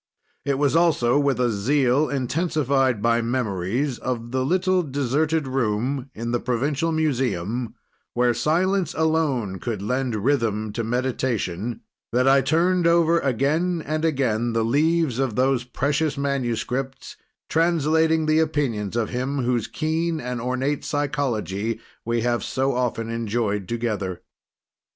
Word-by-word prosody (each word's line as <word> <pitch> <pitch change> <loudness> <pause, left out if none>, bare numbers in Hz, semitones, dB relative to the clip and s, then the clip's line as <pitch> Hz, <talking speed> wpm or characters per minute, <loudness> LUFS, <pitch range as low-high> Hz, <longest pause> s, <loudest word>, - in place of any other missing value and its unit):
It 140 -1 0
was 145 +1 +2
also 145 -7 +3
with 140 -4 +1
a 120 -2 +2
zeal, 130 +6 +2
intensified 135 - 0
by 115 0 +3
memories 115 +2 -1
of 120 -2 -4
the 130 0 0
little 185 +5 +2
deserted 145 +1 0
room 130 +2 -1
in 115 +2 -3
the 120 - +1
provincial 140 +7 0
museum, 125 - -1 0.4
where 120 0 +3
silence 180 +5 +1
alone 145 -12 0
could 110 -5 -4
lend 125 +1 -1
rhythm 110 -3 0
to 115 - -2
meditation, 115 -4 -2 0.3
that 125 +2 +2
I 135 0 +6
turned 170 +5 +2
over 170 0 +4
again 155 +7 0
and 155 +1 -2
again 120 -7 +1
the 115 -1 +1
leaves 150 +1 +2
of 130 -5 0
those 130 -1 +2
precious 145 +4 -1
manuscripts, 135 -1 -2 0.3
translating 160 -1 +2
the 155 0 +3
opinions 135 -10 -1
of 115 -2 0
him 130 +2 -2
whose 120 -2 0
keen 160 +1 -1
and 125 -2 -4
ornate 130 +4 -1
psychology 125 - -2 0.2
we 115 0 0
have 120 0 0
so 135 +1 0
often 115 -2 -1
enjoyed 110 -3 -1
together. 105 -6 -3
130 Hz, 130 wpm, -23 LUFS, 115-150 Hz, 0.4 s, I